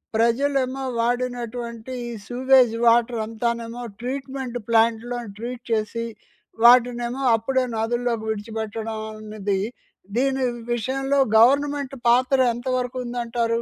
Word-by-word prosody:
ప్రజలేమో 260 Hz, +3 st, +1 dB, 0.2 s
వాడినటువంటి 240 Hz, -1 st, -2 dB, 0.2 s
ఈ 240 Hz, -, -5 dB, 0.2 s
sewage 255 Hz, -1 st, +4 dB
water 235 Hz, 0 st, +3 dB
అంతానేమో 235 Hz, +1 st, -3 dB, 0.2 s
treatment 265 Hz, -1 st, -4 dB
ప్లాంట్‍లోని 230 Hz, 0 st, +1 dB
treat 240 Hz, +1 st, -6 dB
చేసి, 225 Hz, +1 st, -1 dB, 0.6 s
వాటినేమో 240 Hz, +1 st, +5 dB
అప్పుడే 260 Hz, +4 st, 0 dB
నదుల్లోకి 235 Hz, 0 st, -1 dB
విడిచిపెట్టడం 220 Hz, 0 st, -4 dB, 0.2 s
అనేది, 210 Hz, -2 st, -2 dB, 0.6 s
దీని 265 Hz, 0 st, +1 dB, 0.3 s
విషయంలో 270 Hz, +4 st, 0 dB, 0.2 s
గవర్నమెంట్ 280 Hz, +3 st, +3 dB
పాత్ర 255 Hz, +3 st, +4 dB, 0.2 s
ఎంతవరకు 255 Hz, 0 st, -2 dB
ఉందంటారు? 235 Hz, -1 st, -1 dB
240 Hz, 95 wpm, -23 LUFS, 230-255 Hz, 0.6 s, వాటినేమో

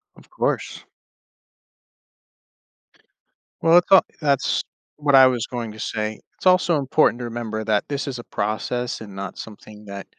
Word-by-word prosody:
Of -, -, -19 dB
course. -, -, -2 dB, 2.8 s
Well, 165 Hz, +1 st, +6 dB
it's 180 Hz, -, -8 dB
al 190 Hz, -, +8 dB, 0.2 s
that's 140 Hz, -3 st, +1 dB, 0.3 s
what 145 Hz, -2 st, +2 dB
I 135 Hz, -1 st, +9 dB
was 125 Hz, -3 st, -1 dB
going 120 Hz, -3 st, -5 dB
to 110 Hz, -, -13 dB
say. 110 Hz, 0 st, -3 dB, 0.2 s
It's -, -, -14 dB
also 180 Hz, -3 st, +4 dB
important 135 Hz, -2 st, +2 dB
to 120 Hz, -, -4 dB
remember 115 Hz, -2 st, -4 dB
that 105 Hz, -1 st, 0 dB
this 140 Hz, 0 st, -3 dB
is 130 Hz, -3 st, -4 dB
a 120 Hz, -, -8 dB
process 120 Hz, +4 st, -3 dB
and 100 Hz, -3 st, -10 dB
not 95 Hz, -1 st, -6 dB
something 105 Hz, 0 st, -11 dB
that 100 Hz, -1 st, -8 dB
120 Hz, 155 wpm, -22 LUFS, 110-140 Hz, 2.8 s, I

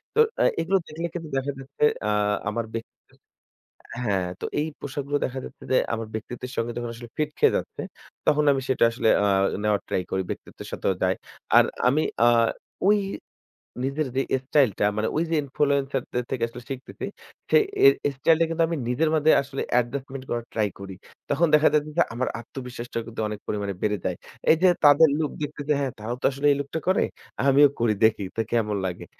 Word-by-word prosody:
তো -, -, +2 dB, 0.2 s
আ -, -, +5 dB, 0.2 s
এগুলো 180 Hz, +4 st, +2 dB
দেখলে 165 Hz, +2 st, -4 dB
কিন্তু 165 Hz, -3 st, -6 dB
দেখা 140 Hz, +2 st, -1 dB
যাচ্ছে 135 Hz, +2 st, -5 dB, 0.2 s
আ -, -, +1 dB, 0.4 s
আমার 115 Hz, +1 st, -2 dB
ব্যক্তি 115 Hz, 0 st, -5 dB, 1.1 s
হ্যা, 100 Hz, -4 st, +1 dB, 0.3 s
তো -, -, -2 dB
এই 155 Hz, -, 0 dB
পোশাকগুলো 145 Hz, +1 st, -2 dB
দেখা 130 Hz, +1 st, -4 dB
যাচ্ছে -, -, -12 dB
যে 130 Hz, -, +5 dB, 0.2 s
আমার 115 Hz, -1 st, -3 dB
ব্যক্তিত্বের 120 Hz, +3 st, -6 dB
সঙ্গে 115 Hz, +1 st, -1 dB
যখন 120 Hz, -1 st, -3 dB
আসলে 120 Hz, 0 st, -10 dB
ফিট 150 Hz, -1 st, 0 dB
খেয়ে -, -, +4 dB
যাচ্ছে -, -, -6 dB, 0.5 s
তখন 150 Hz, 0 st, +4 dB
আমি 135 Hz, -, 0 dB
সেটা 130 Hz, -, +2 dB
আসলে 115 Hz, -1 st, -1 dB, 0.2 s
আ -, -, +3 dB, 0.4 s
নেওয়ার 105 Hz, -1 st, +2 dB
ট্রাই 90 Hz, -, -1 dB
করি। 95 Hz, -, 0 dB
ব্যক্তিত্বের -, -, -7 dB
সাথেও 95 Hz, -, 0 dB
যাই। 95 Hz, 0 st, +2 dB, 0.4 s
আর -, -, +7 dB, 0.2 s
আমি 145 Hz, +5 st, +3 dB, 0.2 s
আ -, -, +6 dB, 0.6 s
ঐ -, -, +4 dB, 1.0 s
নিজের 140 Hz, +3 st, -1 dB
যে 135 Hz, -, +3 dB, 0.2 s
স্টাইল 140 Hz, -3 st, +4 dB
টা -, -, +3 dB
মানে 110 Hz, +1 st, +1 dB
ওই 165 Hz, -, +2 dB
যে 165 Hz, -, +1 dB
ইনফ্লুয়েন্সার 140 Hz, -1 st, 0 dB, 0.3 s
থেকে 125 Hz, -3 st, -1 dB
আসলে 115 Hz, +1 st, -10 dB
শিখতেছি 130 Hz, -1 st, -6 dB, 0.5 s
সেই 445 Hz, -, +6 dB, 0.4 s
এ -, -, +2 dB
স্টাইল 160 Hz, +4 st, +4 dB
টা 165 Hz, -, +5 dB
কিন্তু 165 Hz, 0 st, +1 dB
আমি 165 Hz, 0 st, -2 dB
নিজের 155 Hz, +6 st, +2 dB
মধ্যে 155 Hz, +1 st, +4 dB
আসলে 135 Hz, 0 st, -5 dB, 0.2 s
adjustment 130 Hz, +2 st, -4 dB
করার 120 Hz, -1 st, -2 dB
ট্রাই 110 Hz, -2 st, +1 dB
করি। 95 Hz, -1 st, -8 dB, 0.3 s
তখন 155 Hz, +4 st, +3 dB
দেখা 150 Hz, 0 st, +6 dB
যাচ্ছে 150 Hz, 0 st, +1 dB
যে 170 Hz, -, +6 dB
আমার 125 Hz, +2 st, -1 dB
আত্মবিশ্বাসটা 120 Hz, -1 st, -6 dB
কিন্তু 115 Hz, -1 st, -5 dB
অনেক 105 Hz, -1 st, -5 dB
পরিমাণে 100 Hz, -1 st, -2 dB
বেড়ে 105 Hz, -1 st, +1 dB
যায়। -, -, 0 dB, 0.4 s
এই 160 Hz, -, +7 dB
যে -, -, +8 dB, 0.2 s
তাদের 145 Hz, +2 st, +8 dB
লুক 155 Hz, -2 st, -1 dB
দেখতেছে 150 Hz, 0 st, -2 dB
হ্যা 140 Hz, -1 st, 0 dB
তারাও 110 Hz, +3 st, -4 dB
তো -, -, -2 dB
আসলে 140 Hz, +2 st, -4 dB
এই 140 Hz, -, +3 dB
লুকটা 140 Hz, +3 st, -3 dB
করে। 185 Hz, -, +3 dB, 0.4 s
আমিও 140 Hz, +1 st, +7 dB
করি 115 Hz, -2 st, +3 dB
দেখি 110 Hz, -2 st, +4 dB
তো 115 Hz, -, +1 dB
কেমন 110 Hz, -3 st, +1 dB
লাগে। 90 Hz, -2 st, -4 dB
135 Hz, 190 wpm, -25 LUFS, 115-150 Hz, 1.1 s, যে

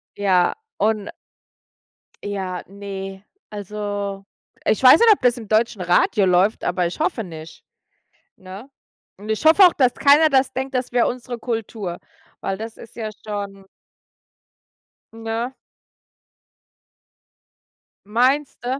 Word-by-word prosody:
ja, 185 Hz, -3 st, +2 dB, 0.2 s
und 210 Hz, 0 st, 0 dB, 1.1 s
Ja, 190 Hz, -3 st, -4 dB
ne. 195 Hz, -1 st, -8 dB, 0.3 s
Also, 205 Hz, -1 st, -5 dB, 0.4 s
ich -, -, +1 dB
weiß 260 Hz, +4 st, +8 dB
nicht, 465 Hz, -1 st, +6 dB
ob -, -, -6 dB
das 245 Hz, -1 st, +2 dB
im 225 Hz, -3 st, -9 dB
deutschen 215 Hz, -1 st, +1 dB
Radio 180 Hz, +3 st, +2 dB
läuft, 185 Hz, +3 st, +2 dB
aber 175 Hz, 0 st, 0 dB
ich 170 Hz, -, -8 dB
hoffe 305 Hz, -7 st, -1 dB
nicht, 160 Hz, -3 st, -11 dB, 0.7 s
ne? 190 Hz, +7 st, -11 dB, 0.5 s
Und 205 Hz, +3 st, -11 dB
ich 220 Hz, +4 st, -1 dB
hoffe 325 Hz, +5 st, +7 dB
auch, 360 Hz, -, +7 dB
dass 255 Hz, -3 st, +2 dB
keiner 295 Hz, +3 st, +5 dB
das 265 Hz, -2 st, +2 dB
denkt, 265 Hz, +2 st, -4 dB
das 255 Hz, -1 st, -2 dB
wäre 245 Hz, -1 st, +2 dB
unsere 245 Hz, 0 st, -5 dB
Kultur, 225 Hz, -6 st, -4 dB, 0.4 s
weil 195 Hz, -, -3 dB
das 225 Hz, +2 st, -8 dB
ist 230 Hz, -, -14 dB
ja 220 Hz, -2 st, -4 dB, 0.2 s
schon 200 Hz, -2 st, -6 dB, 1.5 s
Ne? 225 Hz, +2 st, -4 dB, 2.5 s
Meinst 255 Hz, +7 st, +1 dB
du? 255 Hz, +3 st, -2 dB
215 Hz, 125 wpm, -21 LUFS, 195-250 Hz, 2.5 s, weiß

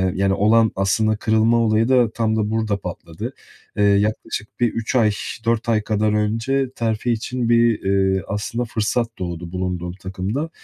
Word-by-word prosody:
yani, 95 Hz, 0 st, +2 dB
olan 110 Hz, +3 st, +4 dB
aslında 110 Hz, +3 st, +1 dB
kırılma 110 Hz, +2 st, +2 dB
olayı 115 Hz, 0 st, +2 dB
da 125 Hz, -4 st, +4 dB
tam 110 Hz, -1 st, 0 dB
da 105 Hz, -1 st, 0 dB
burada 110 Hz, -2 st, 0 dB
patladı. 85 Hz, -3 st, -7 dB, 0.4 s
Iıı, 100 Hz, -1 st, +4 dB
yaklaşık 110 Hz, +1 st, -3 dB
bir 120 Hz, -2 st, +2 dB
3 115 Hz, +2 st, -3 dB
ay, 110 Hz, -4 st, +4 dB, 0.3 s
4 115 Hz, 0 st, 0 dB
ay 110 Hz, -2 st, +3 dB
kadar 105 Hz, 0 st, 0 dB
önce 115 Hz, +6 st, 0 dB
terfi 115 Hz, +1 st, -1 dB
için 120 Hz, +1 st, -2 dB
bir, 115 Hz, -1 st, +4 dB
iii, 95 Hz, -1 st, +2 dB
aslında 105 Hz, +4 st, -2 dB
fırsat 115 Hz, +1 st, -1 dB
doğdu 85 Hz, -2 st, -5 dB
bulunduğum 90 Hz, -1 st, -3 dB
takımda 95 Hz, -, -4 dB
110 Hz, 160 wpm, -21 LUFS, 100-115 Hz, 0.4 s, olan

